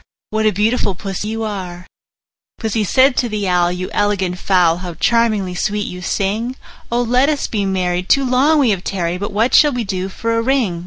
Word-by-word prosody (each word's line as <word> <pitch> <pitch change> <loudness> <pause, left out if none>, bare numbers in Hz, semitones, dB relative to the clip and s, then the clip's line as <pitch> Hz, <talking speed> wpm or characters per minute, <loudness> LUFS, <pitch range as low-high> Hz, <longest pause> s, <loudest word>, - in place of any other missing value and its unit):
What 220 0 +1
a - - +4
beautiful 210 0 0
Pussy 195 +2 -5
you 225 +1 -3
are!" 185 -5 -5
II. - - -17 0.7
Pussy 220 -1 -1
said 260 +7 +3
to 240 - +1
the 210 -2 -2
Owl, 175 -1 +2
"You 180 +1 -4
elegant 195 -3 0
fowl, 180 -4 +3
How 180 -2 -7
charmingly 215 -2 +1
sweet 205 +3 -2
you 180 0 -7
sing! 210 +7 -2 0.4
Oh! 240 +1 +1
let 250 +4 +2
us 295 -2 -1
be 205 -3 -2
married; 180 -1 -1
too 275 -1 +4
long 270 +5 +3
we 265 -6 +3
have 190 -2 -2
tarried: 180 -2 -2
But 205 - -4
what 220 +5 +1
shall 295 -2 +6
we 245 -1 -2
do 190 -2 -3
for 230 +4 -2
a 230 - +1
ring?" 230 -8 0
205 Hz, 210 wpm, -18 LUFS, 185-235 Hz, 0.7 s, shall